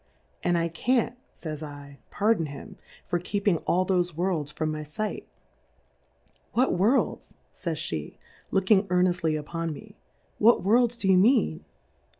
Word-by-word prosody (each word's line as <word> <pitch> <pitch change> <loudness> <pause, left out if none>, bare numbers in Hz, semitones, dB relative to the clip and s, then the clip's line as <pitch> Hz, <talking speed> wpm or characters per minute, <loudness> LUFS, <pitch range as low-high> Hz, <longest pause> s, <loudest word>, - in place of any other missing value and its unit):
And 175 -1 +1
I 170 0 +1
can't, 235 +8 0 0.2
fays 155 -3 -6
7, 145 -2 -10
pardon 205 -6 +1
him, 150 +8 -9 0.3
for 175 - -1
keeping 200 0 0
all 185 +1 +2
thofe 180 -3 +1
"Worlds 165 -4 -1
from 155 0 -2
my 155 0 -4
fight: 210 +9 -4 1.3
What 255 +3 +2
Worlds,. 215 +9 +1 0.2
fays 165 -3 -4
pe^ 80 - -4 0.3
looking 195 +1 +3
earneftly 180 -3 +1
upon 165 +1 -4
uie,. 210 +3 -12 0.5
whu 230 +3 +6
V/orJJs 235 +4 +3
do 195 - -1
you 190 -1 +6
mean 235 +8 +3
180 Hz, 140 wpm, -27 LUFS, 155-210 Hz, 1.3 s, whu